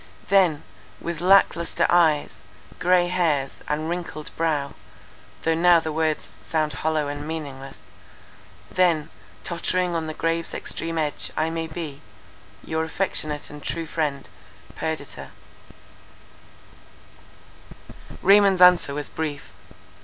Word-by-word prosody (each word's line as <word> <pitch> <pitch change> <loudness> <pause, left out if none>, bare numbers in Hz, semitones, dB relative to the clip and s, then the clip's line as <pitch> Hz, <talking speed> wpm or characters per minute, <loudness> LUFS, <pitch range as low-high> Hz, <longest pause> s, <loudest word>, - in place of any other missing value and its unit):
Then, 180 -6 +4 0.4
with 170 -1 -4
lack 195 +2 +6
lustre 170 0 0
eyes, 160 -4 +3 0.4
grey 180 0 +4
hairs, 160 -7 0
and 155 +1 -1
wrinkled 170 -3 -5
brow, 150 -4 0 0.7
though 165 - +2
now 170 +1 +5
the 160 -1 -4
words 155 0 -1
sound 155 -2 -1
hollow 155 -2 -1
and 145 +1 -5
meaningless, 140 -4 -6 0.9
then, 165 -4 +2 0.3
tottering 175 +1 0
on 160 -1 -2
the 155 - -5
grave's 165 0 -1
extreme 165 0 -3
edge, 150 -2 -2
I 160 +1 +1
may 165 0 -3
be—your 160 0 -7
affectionate 155 -4 -2
and 150 0 -10
true 165 +3 -3
friend, 150 -3 -2 0.5
"PERDITA." 160 -3 -5 2.9
Raymond's 195 -1 +6
answer 180 -6 +6
was 145 0 -3
brief. 150 -3 -5
160 Hz, 110 wpm, -24 LUFS, 150-170 Hz, 2.9 s, lack